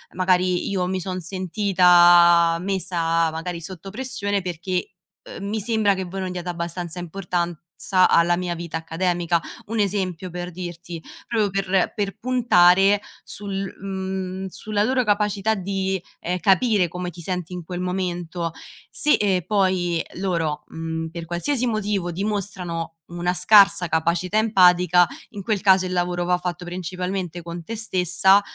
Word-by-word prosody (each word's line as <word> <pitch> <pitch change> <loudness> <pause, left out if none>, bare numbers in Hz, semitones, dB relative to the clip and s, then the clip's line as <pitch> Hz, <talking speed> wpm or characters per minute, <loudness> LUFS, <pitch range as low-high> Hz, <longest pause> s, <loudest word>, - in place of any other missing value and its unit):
"Magari 185 -1 +2
io 185 -2 -1
mi 185 0 -1
son 185 +1 -4
sentita 175 -2 +5
messa, 170 -3 0
magari, 165 +2 -5
sotto 185 +2 -8
pressione 205 -4 -2
perché, 180 +1 -3 0.5
uhm, 200 - -5
mi 220 +1 -1
sembra 215 -1 +2
che 190 -1 -4
voi 190 +2 -5
non 185 - -3
diate 180 0 -6
abbastanza 170 0 -4
importanza 175 0 -1
alla 175 +1 +4
mia 180 -1 -2
vita 165 -1 -5
accademica"; 170 +1 0 0.3
un 225 +1 -2
esempio, 190 -3 -1
per 175 +1 -6
dirti, 175 -1 -7 0.3
proprio 220 -4 +1
per 195 -1 0
per 200 -3 -3
puntare 200 -5 +4 0.2
sul 195 -1 -4
mhmm, 190 -1 -4
sulla 205 +2 -2
loro 255 +3 +2
capacità 210 0 +1
di, 190 -1 -2 0.2
ehm, 180 +2 -2
capire 195 +1 +3
come 180 +2 -5
ti 170 0 -11
senti 180 0 -4
in 180 -1 -6
quel 180 +1 -5
momento, 175 -2 -3 0.4
se, 300 - +2
ehm, 190 -4 +2
poi 185 -4 +1
loro, 170 -5 -1
mhmm, 160 0 -4
per 170 0 -7
qualsiasi 230 - -1
motivo, 205 -5 -1
dimostrano 185 -4 -3
una 175 +1 -2
scarsa 200 -1 +5
capacità 170 +5 0
empatica, 180 -4 +5 0.3
in 205 -3 -7
quel 210 0 0
caso 190 -1 +5
il 185 - -4
lavoro 175 -1 0
va 180 0 +2
fatto 180 0 -4
principalmente 180 0 -4
con 170 0 -7
te 225 +7 -6
stessa, 190 -2 +3
180 Hz, 145 wpm, -23 LUFS, 175-195 Hz, 0.5 s, sentita